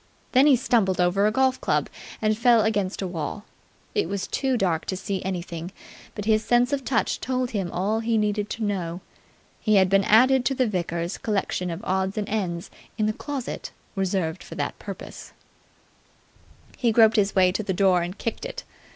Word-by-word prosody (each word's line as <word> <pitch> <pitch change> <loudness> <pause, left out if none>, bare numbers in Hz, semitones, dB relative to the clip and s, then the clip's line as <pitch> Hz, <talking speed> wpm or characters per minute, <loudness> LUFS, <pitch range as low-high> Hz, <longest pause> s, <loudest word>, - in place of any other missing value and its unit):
Then 265 +3 +5
he 285 - +7
stumbled 225 -7 +1
over 185 +3 +3
a - - +2
golf 260 +2 +1
club - - +1 0.4
and 215 0 +3
fell 235 0 +4
against 205 -3 -1
a - - -2
wall. 180 +4 -5 0.5
It 415 - 0
was 200 -2 -2
too 265 -2 0
dark 175 -7 0
to 185 - -3
see 190 0 -3
anything, 175 -2 -4 0.4
but 205 - -5
his 215 0 +3
sense 245 +3 +2
of 275 -1 -1
touch 245 -3 0
told 255 -1 -1
him 195 -5 -2
all 205 +5 0
he 225 0 0
needed 210 -1 0
to 225 - -4
know. 185 -4 -2 0.6
He 215 - +2
had 190 -2 +5
been 195 +1 +4
added 255 +4 +5
to 270 - +1
the 255 - +2
vicar's 170 -3 -2
collection 195 -4 -1
of 170 +5 -5
odds 190 +1 -1
and 210 -1 -2
ends 180 -5 -3 0.3
in 215 - +1
the 215 - +1
closet 275 +1 -5 0.2
reserved 190 -3 -1
for - - -10
that - - -3
purpose. - - -9 1.4
He 235 -2 +2
groped 225 0 +5
his 200 -1 +2
way 185 -1 +5
to 190 - -2
the 200 - -3
door 185 -1 +3
and 175 +3 -5
kicked 230 - -4
it. - - -6
205 Hz, 190 wpm, -25 LUFS, 185-230 Hz, 1.4 s, he